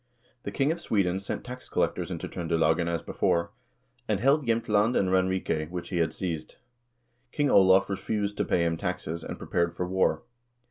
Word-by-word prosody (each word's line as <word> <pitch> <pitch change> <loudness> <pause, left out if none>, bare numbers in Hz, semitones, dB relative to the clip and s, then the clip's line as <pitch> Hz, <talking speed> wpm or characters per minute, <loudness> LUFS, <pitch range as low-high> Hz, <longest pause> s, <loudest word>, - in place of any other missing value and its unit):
The - - -5
king 140 +2 +1
of 170 +1 -4
Sweden 95 - +1
sent 95 - -5
tax 125 +1 -8
collectors - - 0
into - - -4
Tr0ndelagen, 80 0 +1
as 85 -1 -2
before, 90 +2 0 0.6
and 105 -3 +1
held 135 +3 +3
Jsemtland 115 0 +2
and 95 - +2
Ranrike, 95 -4 0
which 90 0 -6
he 90 - -2
had 80 -1 +1
seized. 80 -4 -4 0.8
King 145 -2 +1
Olav 95 0 +6
refused 105 +1 -2
to - - +1
pay 85 - +1
him 80 -1 0
taxes, 85 -2 -3
and - - -6
prepared 85 0 -1
for 90 - -2
war. 95 +5 +1
95 Hz, 175 wpm, -27 LUFS, 85-105 Hz, 0.8 s, Olav